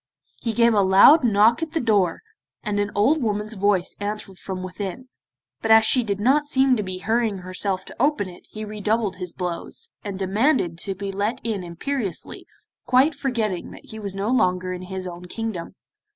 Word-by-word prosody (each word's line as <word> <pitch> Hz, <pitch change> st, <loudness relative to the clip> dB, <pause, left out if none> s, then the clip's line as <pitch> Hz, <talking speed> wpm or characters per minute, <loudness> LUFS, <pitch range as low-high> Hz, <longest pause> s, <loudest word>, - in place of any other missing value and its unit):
He 230 Hz, -, -2 dB
gave 235 Hz, 0 st, +4 dB
a 205 Hz, -, +4 dB
loud 195 Hz, +11 st, +7 dB
knock 225 Hz, +3 st, +4 dB
at 325 Hz, -1 st, -4 dB
the 325 Hz, -, +1 dB
door, 205 Hz, -, +1 dB, 0.4 s
and 205 Hz, -1 st, -1 dB
an 205 Hz, 0 st, 0 dB
old 275 Hz, +10 st, +3 dB
woman's 210 Hz, -1 st, -2 dB
voice 200 Hz, -3 st, +1 dB
answered 205 Hz, -2 st, -5 dB
from 185 Hz, -1 st, -5 dB
within, 195 Hz, +7 st, -6 dB, 0.5 s
but 225 Hz, -, -2 dB
as 220 Hz, 0 st, +7 dB
she 250 Hz, +2 st, +3 dB
did 200 Hz, -3 st, -2 dB
not 280 Hz, +7 st, +3 dB
seem 265 Hz, -2 st, +3 dB
to 215 Hz, -, -1 dB
be 185 Hz, -2 st, -5 dB
hurrying 220 Hz, +1 st, 0 dB
herself 185 Hz, +1 st, -2 dB
to -, -, -8 dB
open 285 Hz, -8 st, +2 dB
it 175 Hz, -1 st, -13 dB
he 215 Hz, 0 st, -6 dB
redoubled 210 Hz, -1 st, -1 dB
his 180 Hz, -2 st, -5 dB
blows, 180 Hz, -, -4 dB
and 200 Hz, -2 st, -5 dB
demanded 195 Hz, -, +1 dB
to 195 Hz, +2 st, -4 dB
be 195 Hz, +1 st, -4 dB
let 205 Hz, +4 st, -1 dB
in 215 Hz, -5 st, -2 dB
imperiously, 195 Hz, +5 st, -4 dB, 0.4 s
quite 260 Hz, +5 st, +4 dB
forgetting 235 Hz, -10 st, -2 dB
that -, -, -13 dB
he 220 Hz, -, -8 dB
was 200 Hz, -2 st, -5 dB
no 200 Hz, +3 st, -2 dB
longer 185 Hz, -6 st, +1 dB
in 180 Hz, -, -6 dB
his 185 Hz, 0 st, -5 dB
own 175 Hz, 0 st, -7 dB
kingdom. 215 Hz, -2 st, -5 dB
205 Hz, 190 wpm, -23 LUFS, 190-235 Hz, 0.5 s, loud